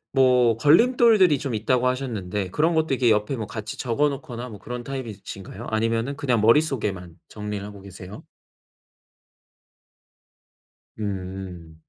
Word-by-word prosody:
뭐 125 -4 +4
걸림돌들이 190 - +5
좀 130 -5 -3
있다고 125 +3 +1
하셨는데 105 -7 -3
그런 165 +2 +1
것도 160 -3 +1
이렇게 125 -2 +2
옆에 105 +4 +1
뭐 110 -3 -5
같이 105 +1 -7
적어놓거나 130 -1 -1
뭐 105 - -10
그런 125 +3 -6
타입이신가요? 115 -5 -7
아니면은 115 +4 0
그냥 125 -5 0
머릿속에만 105 - +1
정리를 105 -1 -5
하고 105 -1 -10
계세요? 95 +1 -10 2.8
음. 95 -4 -6
115 Hz, 305 characters per minute, -24 LUFS, 100-135 Hz, 2.8 s, 걸림돌들이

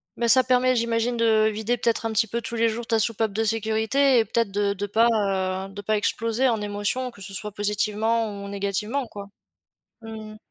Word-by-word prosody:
mais 235 -1 0
ça 260 0 +6
permet 255 0 +3
j'imagine 235 +1 0
de 220 -1 +3
vider, 220 +3 -1
peut-être, 230 -1 -1
un 225 - -1
petit 225 +1 +3
peu 235 +2 -3
tous 235 0 -5
les 230 0 +2
jours 230 +1 -5
ta 225 -1 +2
soupape 220 -1 0
de 225 +2 0
sécurité 225 +5 +2
et 225 - +4
peut-être 230 -2 0
de 200 0 0
de 200 +1 -4
pas, 225 +4 +3 0.6
heu, - - -13
de 205 - -7
pas 215 +2 0
exploser 230 +4 0
en 225 -4 0
émotions 205 +5 -2
que 205 - -16
ce 195 +1 -9
soit 210 +2 -5
positivement 210 +1 -1
ou - - -7
négativement 200 +6 -2
quoi, 200 -1 -9 0.7
mmh 220 -1 -8
mh. 215 - -13
220 Hz, 210 wpm, -24 LUFS, 205-235 Hz, 0.7 s, ça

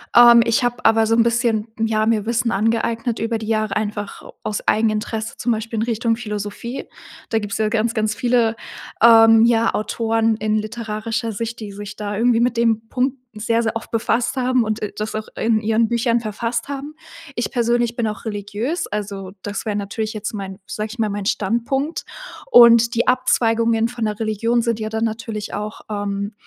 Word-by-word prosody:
Ähm, 235 -1 +9
ich 230 +2 +2
habe 245 0 -2
aber 225 0 +4
so 225 - +3
'n 230 - +5
bisschen, 230 -2 +1
ja, 220 -1 +1
mir 220 -2 +1
Wissen 235 +1 0
angeeignet 230 +2 0
über 225 0 -1
die 220 -1 -7
Jahre 215 -1 0
einfach 205 -1 -4 0.2
aus 210 - -4
Eigeninteresse, 220 +1 0
zum 245 - 0
Beispiel 225 +1 -4
in 220 - +1
Richtung 230 0 0
Philosophie. 210 +2 -5 0.4
Da 225 - +1
gibt's 205 -2 -4
ja 215 -1 +1
ganz, 225 +1 0
ganz 215 -1 0
viele, 235 -1 +2 0.5
ähm, 225 0 +7
ja, 230 -1 +3
Autoren 225 +1 0
in 215 0 0
literarischer 220 +1 -3
Sicht, 230 +2 -5
die 210 -2 -6
sich 205 +1 -8
da 205 -1 -4
irgendwie 235 +1 +3
mit 240 -1 +1
dem 225 -1 +1
Punkt 260 +1 0 0.2
sehr, 230 +2 +1
sehr 220 0 -1
oft 230 - -6
befasst 230 +3 0
haben 255 -1 +2
und, 215 0 -2
äh, 210 - -4
das 215 +1 -4
auch 215 0 -4
in 225 -1 +1
ihren 220 +1 +1
Büchern 235 0 +1
verfasst 230 +3 -3
haben. 285 +2 -6 0.4
Ich 235 - -2
persönlich 240 -1 +1
bin 235 -2 0
auch 210 -1 -5
religiös, 215 - -3
also, 200 -2 -5
das 205 0 -5
wäre 210 -2 -1
natürlich 215 +2 -3
jetzt 215 0 -5
mein 195 -2 -6
sag 210 +3 -3
ich 240 - -10
mal, 215 -2 +1
mein 200 -1 -4
Standpunkt, 240 - -1 0.4
und 235 -1 +7
die 235 - +1
Abzweigungen 230 -2 +2
von 240 -2 -3
der 210 -1 -2
Religion 230 +2 +1
sind 230 -1 -1
ja 215 - -3
dann 220 +1 -2
natürlich 220 -1 -4
auch, 210 +1 -5
ähm, 205 0 -3
225 Hz, 190 wpm, -20 LUFS, 215-235 Hz, 0.5 s, Ähm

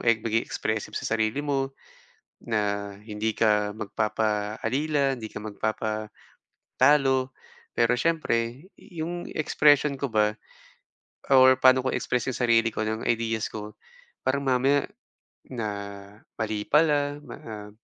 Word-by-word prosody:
eh 115 - +5
maging 115 0 0
expressive 110 -1 -3
sa 110 - -1
sarili 110 +5 0
mo 135 -2 -1 0.7
na 100 -2 -1
hindi 110 0 -2
ka 105 -2 +2
magpapaalila, 110 +7 -1
hindi 110 - -6
ka - - -5
magpapatalo. 110 0 -4 1.5
Pero 115 +1 +3
siyempre 135 -4 0
i 175 -6 -10
yung 175 +1 -4
expression 145 -2 +3
ko 140 - -1
ba 105 0 +2 1.0
or 130 0 +8
paano 130 0 +6
ko 130 - +2
express 125 -2 -1
'yong 130 - -4
sarili 115 -1 +4
ko - - -3
ng 110 +1 -2
ideas 115 -1 0
ko 105 0 -7 0.5
parang 140 +2 +1
mamaya 135 +2 +2 0.6
na 115 -4 -3 0.7
mali 110 -1 -2
pala, 145 -2 +2
na 105 -7 -9
115 Hz, 120 wpm, -26 LUFS, 110-135 Hz, 1.5 s, or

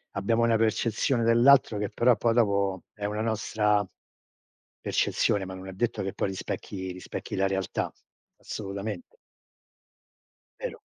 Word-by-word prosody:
abbiamo 115 +4 +1
una 115 -1 +4
percezione 115 +2 +1
dell'altro 120 0 +5
che 105 0 -2
però 120 0 +3
poi 115 -1 +1
dopo 100 -5 +1
è 105 - -10
una 105 +1 -2
nostra 105 -2 +1 0.9
percezione, 100 -2 +1
ma 95 - -7
non 95 +1 -9
è 95 - -7
detto 115 +3 -1
che 95 - -3
poi - - -1
rispecchi 95 0 -5
rispecchi 90 - -6
la 95 0 +2
realtà, 95 -1 -2 0.5
assolutamente. 100 -1 -6 1.4
Vero. - - -5
105 Hz, 130 wpm, -27 LUFS, 95-115 Hz, 1.4 s, dell'altro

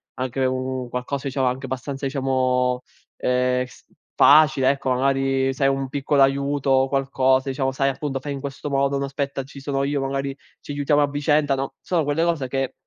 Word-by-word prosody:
anche 130 +1 -2
un 130 -1 -2
qualcosa, 130 +3 -3
diciamo, 135 -1 0
anche 130 +2 -2
abbastanza, 135 +2 -5
diciamo, 130 -2 0 0.4
ehm, 125 0 +1
s 125 - -17 0.3
facile, 145 -3 +6
ecco. 135 -2 -2
Magari 135 0 +1
se 130 - -3
hai - - +5
un 135 0 -1
piccolo 140 0 +1
aiuto 140 0 0
o 135 0 +4
qualcosa, 135 -1 +1
diciamo, 135 0 -1
sai, 135 +1 +1
appunto: 135 0 -3
“Fai 145 +1 -5
in 140 - -5
questo 140 +1 -5
modo”. 140 0 +1
“No, 140 - -1
aspetta, 140 0 -3
ci 140 +1 -12
sono 135 0 -1
io, 140 0 -1
magari 135 0 -2 0.2
ci - - -9
aiutiamo 145 +1 +2
a 145 - +2
vicenda”, 145 0 +1
no. 135 0 -4
Sono 170 -3 0
quelle 145 +3 0
cose 165 -6 0
che 135 0 -2
135 Hz, 190 wpm, -23 LUFS, 130-140 Hz, 0.4 s, facile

